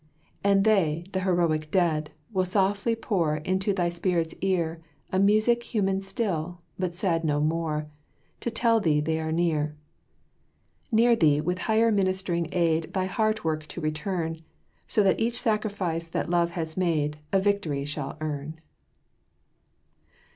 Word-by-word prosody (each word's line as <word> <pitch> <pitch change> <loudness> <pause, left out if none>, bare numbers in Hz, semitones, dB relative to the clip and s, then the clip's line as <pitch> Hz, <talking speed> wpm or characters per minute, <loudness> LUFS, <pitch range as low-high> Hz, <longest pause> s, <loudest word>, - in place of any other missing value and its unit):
And 200 -1 +4
they, 175 -7 +2
"the 190 - -1
heroic 170 -4 +1
dead," 155 -4 +1 0.2
will 185 -1 +2
softly 200 +4 +1
pour 175 -9 0
Into 185 +6 0
thy 180 -3 +1
spirit's 170 -1 -1
ear 170 -4 0 0.3
A 185 - +1
music 215 +4 +4
human 195 -4 0
still, 180 -4 -3 0.2
but 180 -2 -2
sad 170 -3 0
no 145 -2 +1
more, 155 0 -1 0.5
To - - -2
tell 230 0 +2
thee 155 -7 +2
they 160 +2 0
are 160 0 -2
near 155 -3 0 1.2
Near 235 +1 +5
thee 150 -7 +4
with 180 +4 -1
higher 225 +1 +4
ministering 185 -4 0
aid 165 -2 +1
Thy 185 -1 +1
heart 215 +2 0
work 155 -1 -2
to - - -6
return, 160 +1 -2 0.5
So 210 - +3
that 190 - +3
each 235 +1 +2
sacrifice 200 -7 -1
that 165 - -3
love 170 -1 +3
has 160 -1 -3
made 150 -5 0
A 195 - +4
victory 190 -8 0
shall 145 -1 -5
earn! 155 +1 -4
175 Hz, 145 wpm, -26 LUFS, 160-200 Hz, 1.2 s, Near